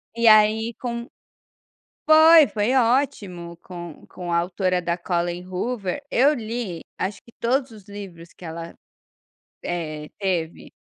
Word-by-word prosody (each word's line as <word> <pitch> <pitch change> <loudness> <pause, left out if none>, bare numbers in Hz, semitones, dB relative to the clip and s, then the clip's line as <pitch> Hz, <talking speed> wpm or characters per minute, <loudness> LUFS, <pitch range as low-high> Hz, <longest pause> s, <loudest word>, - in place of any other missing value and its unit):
E 235 0 +2
aí 220 +1 +5
com 235 -1 -4 1.0
foi, 315 0 +8
foi 215 +4 0
ótimo 210 -9 0
com 175 -2 -10
com 175 -1 -7
a 170 - +2
autora 180 +1 0
da 170 0 -1
Collen 175 0 -2
Hoover, 195 +5 -3
eu 275 +5 +4
li 225 - -4 0.2
acho 190 +2 -3
que 235 - -18
todos 255 +2 0
os 210 -3 -14
livros 190 -5 -10
que 180 - -13
ela, 165 +1 -7 0.9
eh, 155 -3 -4
teve. 175 -5 -2
195 Hz, 135 wpm, -23 LUFS, 175-235 Hz, 1.0 s, foi